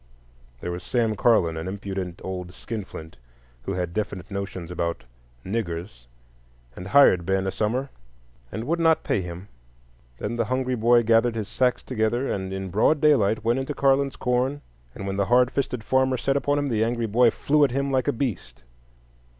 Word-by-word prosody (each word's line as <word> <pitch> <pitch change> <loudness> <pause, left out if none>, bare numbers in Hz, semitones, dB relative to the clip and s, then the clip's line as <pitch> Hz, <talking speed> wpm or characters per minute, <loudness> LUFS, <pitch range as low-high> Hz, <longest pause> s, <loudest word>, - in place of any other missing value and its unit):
There 90 - -3
was 90 +1 -5
Sam 115 -1 0
Carlon, 95 -8 +3
an 80 +2 -4
impudent 95 -2 -5
old 90 -1 -6
skinflint, 95 -8 -7 0.5
who - - -2
had 90 -2 -3
definite 100 -2 -4
notions 95 -3 -5
about 85 -1 -2 0.4
"niggers," 85 - -4 0.7
and 90 - -8
hired 100 -7 +6
Ben 95 +2 0
a 95 - -1
summer 125 +8 -1 0.6
and 110 - -4
would 165 +7 -1
not 165 -1 +3
pay 100 - 0
him. 90 +2 -7 0.7
Then 115 - -4
the 115 - +1
hungry 130 +1 -1
boy 120 0 +4
gathered 115 +1 +3
his 110 -3 -3
sacks 125 +3 0
together, 120 +2 -1
and 95 -1 -3
in 95 -1 -5
broad 125 - +3
daylight 110 -9 +3
went 120 +3 +2
into 135 +2 -4
Carlon's 135 0 +2
corn; 125 +3 0 0.3
and 100 - -6
when 95 0 -3
the 100 - +2
hard 125 +1 +4
fisted 125 -4 -2
farmer 130 +2 +2
set 135 +3 0
upon 145 +1 +1
him, 145 -1 0
the 110 -2 +1
angry 120 0 -1
boy 115 +3 +4
flew 150 +6 +2
at 140 - +4
him 140 +2 -1
like 130 -2 +1
a - - +4
beast. 120 - -4
115 Hz, 180 wpm, -25 LUFS, 95-130 Hz, 0.7 s, hired